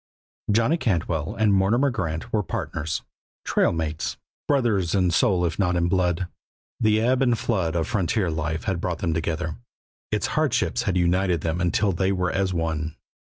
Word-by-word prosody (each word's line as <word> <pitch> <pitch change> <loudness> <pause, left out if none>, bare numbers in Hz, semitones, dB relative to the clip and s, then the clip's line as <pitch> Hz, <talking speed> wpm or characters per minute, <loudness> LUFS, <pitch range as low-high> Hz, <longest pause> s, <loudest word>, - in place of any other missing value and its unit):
Johnny 115 +10 +3
Cantwell 85 - -1
and 110 -2 +3
Mortimer 115 +9 +3
Grant 95 -1 -3
were 110 - +3
partners, 80 -5 -3 0.4
trail - - +2
mates, 80 -2 -3 0.3
brothers 110 - +2
in 90 -3 +3
soul 90 0 +3
if 85 - -2
not 90 -3 +2
in 85 0 +2
blood. 90 0 +1 0.5
The 110 -2 +3
ebb 125 +3 +2
and 120 -3 +3
flood 90 -9 -1
of 80 -2 0
frontier 100 -3 0
life 80 0 -2
had 95 -5 -1
brought 85 -1 -2
them 85 -3 -1
together, 80 -2 -2 0.5
its 105 - 0
hardships 140 -5 +1
had 95 - +1
united 90 -1 +2
them 85 +2 -1
until 95 +3 +2
they 95 +2 +1
were 90 -2 0
as 95 0 0
one. 80 -2 -2
90 Hz, 170 wpm, -24 LUFS, 85-105 Hz, 0.5 s, Johnny